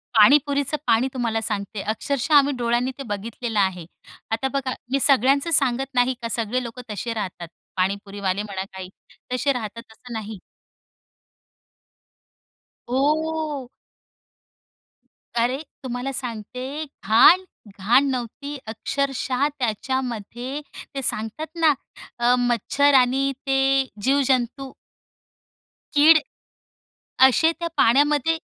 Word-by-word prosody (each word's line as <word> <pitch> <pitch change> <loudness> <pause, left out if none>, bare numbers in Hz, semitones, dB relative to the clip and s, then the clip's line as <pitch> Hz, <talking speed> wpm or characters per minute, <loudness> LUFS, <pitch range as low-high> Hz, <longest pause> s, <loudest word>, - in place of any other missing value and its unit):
पाणीपुरीचं 285 +5 +4
पाणी 230 +3 +3
तुम्हाला 230 -3 -1
सांगते, 210 -1 -4
अक्षरशः 255 +8 -2
आम्ही 285 0 +5
डोळ्यांनी 240 +1 0
ते 275 - -6
बघितलेलं 225 +1 -3
आहे. 185 -3 0 0.5
आता 230 +4 0
बघा 270 -2 -1 0.2
मी 275 - +2
सगळ्यांचं 275 +4 +3
सांगत 270 -3 +2
नाही 250 +1 +2
का, 230 - -3
सगळे 235 +3 -1
लोक 235 +1 -8
तसे 220 +3 -3
राहतात, 190 -5 -5 0.3
पाणीपुरीवाले 200 +1 -1
म्हणा, 195 -2 -5
काही 190 -1 -7 0.4
तसे 265 +3 +1
राहतात 230 -1 -7
असं 240 +2 -12
नाही. 220 -1 -5 2.5
हो. 300 +1 0 1.7
अरे! 245 +4 +1 0.2
तुम्हाला 250 +1 -3
सांगते 255 +4 -5 0.2
घाण? 230 - +6 0.4
घाण 235 +8 +4
नव्हती 265 +3 -4
अक्षरशः 270 +3 -1
त्याच्यामध्ये 245 +2 -3 0.3
ते 275 - -2
सांगतात 225 +7 -2
ना 315 -2 +5 0.5
अ, 240 +1 +4
मच्छर 245 +4 +2
आणि 265 +2 +2 0.2
ते 270 0 +3 0.2
जीव-जंतू. 265 0 +1 1.2
कीड, 310 +2 +8 1.1
असे 265 +6 +3
त्या 335 0 -4
पाण्यामध्ये 295 +5 +3
250 Hz, 105 wpm, -23 LUFS, 225-275 Hz, 2.5 s, कीड